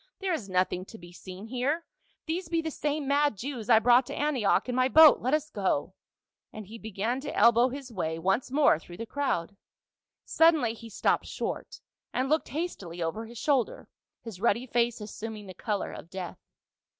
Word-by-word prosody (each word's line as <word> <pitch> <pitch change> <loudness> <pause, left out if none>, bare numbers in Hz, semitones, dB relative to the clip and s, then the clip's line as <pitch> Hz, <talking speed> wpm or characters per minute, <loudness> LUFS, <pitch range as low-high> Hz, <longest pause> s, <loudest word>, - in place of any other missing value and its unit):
" - - -61
There 380 -2 0
is 225 -11 -4
nothing 185 0 0
to 225 - -12
be 175 -2 -13
seen 185 +3 -10
here; 265 +8 -1 0.4
these 330 +1 -3
be 335 -1 +1
the 320 -1 -3
same 295 -1 -2
mad 285 -4 +2
Jews 245 0 -5
I 225 - +8
brought 245 +3 +5
to - - -5
Antioch 270 -10 +1
in 250 - -2
my 255 +1 +3
boat. 315 +2 +8
Let 260 +5 +2
us 305 0 -3
go." 190 -4 -1 0.6
And 215 -1 -8
he 225 +4 -10
began 220 +5 -3
to 290 - -6
elbow 235 +3 +5
his 265 -1 -8
way 160 -4 -2
once 195 +10 0
more 275 - +4
through 175 +1 -12
the 230 - -5
crowd. 215 -8 -2 0.7
Suddenly 315 -8 +4
he 230 0 -11
stopped 215 - 0
short, - - -5 0.3
and 260 +1 -1
looked 310 -1 +1
hastily 245 - -5
over 215 +8 -3
his 235 +1 -11
shoulder, 270 -2 0 0.3
his 215 -5 -9
ruddy 235 +2 +2
face 235 -2 0
assuming 215 0 -7
the 185 - -9
color 205 +1 -3
of 165 - -10
death. 185 -1 -7
235 Hz, 190 wpm, -28 LUFS, 200-285 Hz, 0.7 s, I